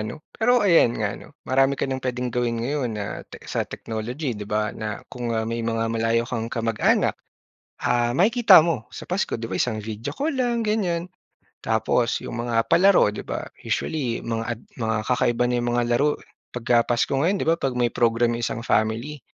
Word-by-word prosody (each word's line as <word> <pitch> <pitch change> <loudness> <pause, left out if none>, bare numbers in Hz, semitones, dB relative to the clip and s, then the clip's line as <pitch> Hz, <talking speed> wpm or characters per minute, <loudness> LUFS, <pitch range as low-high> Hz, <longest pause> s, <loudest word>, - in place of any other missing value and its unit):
ano. 110 +8 -6
Pero 245 0 +3
ayan 165 - +5
nga 105 -2 -1
'no, 145 - -13
marami 135 +1 +2
ka - - -1
nang 130 -1 -3
puwedeng 125 -1 -3
gawin 120 -1 0
ngayon 135 -2 -1
na 100 -1 -3 0.2
tech - - -12
sa - - -2
technology 120 +5 -4
'di 105 -1 -7
ba 105 0 0
na 110 -1 -5
kung, 120 -1 -4
ah, 110 - 0
may 115 +1 -3
mga 115 0 -1
malayo 115 +1 +1
kang 115 -2 -3
kamag-anak, 115 -2 +1 0.7
ah, 120 0 +1
makikita 205 - +6
mo 155 -8 0
sa - - -9
Pasko, 180 - -1
di 115 - -4
ba - - -4
isang 110 -3 0
video 110 +5 -5
call 285 - -2
lang, 240 -3 0
ganyan. 180 -5 0 0.5
Tapos 115 +2 +1
'yong 120 - -4
mga 115 -1 0
palaro 180 - +5
'di - - -5
ba - - -5 0.2
usually 130 -7 -2
mga 115 -1 -2
ad - - -19 0.2
mga 110 0 0
kakaiba 125 -1 +1
na 125 - 0
'yong 120 - -1
mga 120 0 +1
laro 145 +5 +2
eh - - -19 0.3
pagka 120 -1 +2
pasko 120 +3 0
ngayon 190 +5 +2
'di - - -1
ba, 165 - +5
'pag 135 -6 -2
may 120 - +3
program 115 0 +2
yung 120 - -4
isang 115 +2 -3
family. 115 +7 0
120 Hz, 200 wpm, -24 LUFS, 115-150 Hz, 0.7 s, makikita